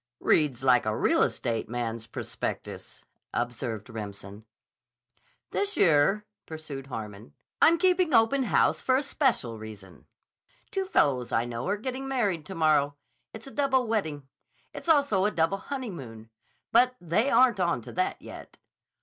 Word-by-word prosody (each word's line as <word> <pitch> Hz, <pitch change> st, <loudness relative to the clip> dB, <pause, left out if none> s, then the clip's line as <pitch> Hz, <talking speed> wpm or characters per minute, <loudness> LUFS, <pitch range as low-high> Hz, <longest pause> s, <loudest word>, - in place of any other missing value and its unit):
"Reads 140 Hz, -5 st, +2 dB
like 125 Hz, -4 st, +4 dB
a 110 Hz, -, 0 dB
real -, -, +2 dB
estate 115 Hz, -3 st, -1 dB
man's 115 Hz, -1 st, -4 dB
prospectus," -, -, -6 dB, 0.3 s
observed 120 Hz, -3 st, -3 dB
Remsen. 105 Hz, -2 st, -8 dB, 1.1 s
"This 405 Hz, +1 st, -1 dB
year," 170 Hz, +6 st, +4 dB, 0.2 s
pursued 155 Hz, -4 st, -7 dB
Harmon, 105 Hz, -, -8 dB, 0.3 s
"I'm 335 Hz, +1 st, +6 dB
keeping 365 Hz, -2 st, +2 dB
open 250 Hz, +3 st, +4 dB
house -, -, +2 dB
for 260 Hz, 0 st, +2 dB
a 275 Hz, -, 0 dB
special 240 Hz, -, 0 dB
reason. 105 Hz, -4 st, -12 dB, 0.6 s
Two 385 Hz, -1 st, -1 dB
fellows 135 Hz, -, +1 dB
I 115 Hz, +1 st, +1 dB
know 120 Hz, +3 st, -5 dB
are 200 Hz, +2 st, 0 dB
getting 260 Hz, +4 st, -5 dB
married 205 Hz, -, -1 dB
to 190 Hz, -, -7 dB
morrow. 150 Hz, -3 st, +2 dB, 0.4 s
It's 220 Hz, +1 st, -10 dB
a 270 Hz, -, -10 dB
double 270 Hz, -3 st, +1 dB
wedding. 160 Hz, -, -2 dB, 0.5 s
It's -, -, -7 dB
also 280 Hz, -11 st, +3 dB
a -, -, +3 dB
double 170 Hz, +1 st, 0 dB
honeymoon. 145 Hz, -, -7 dB, 0.4 s
But 250 Hz, +2 st, +4 dB
they 180 Hz, -, +1 dB
aren't 250 Hz, -7 st, +4 dB
onto 170 Hz, -11 st, -1 dB
that 185 Hz, +1 st, -1 dB
yet." -, -, -11 dB
160 Hz, 140 wpm, -27 LUFS, -, 1.1 s, I'm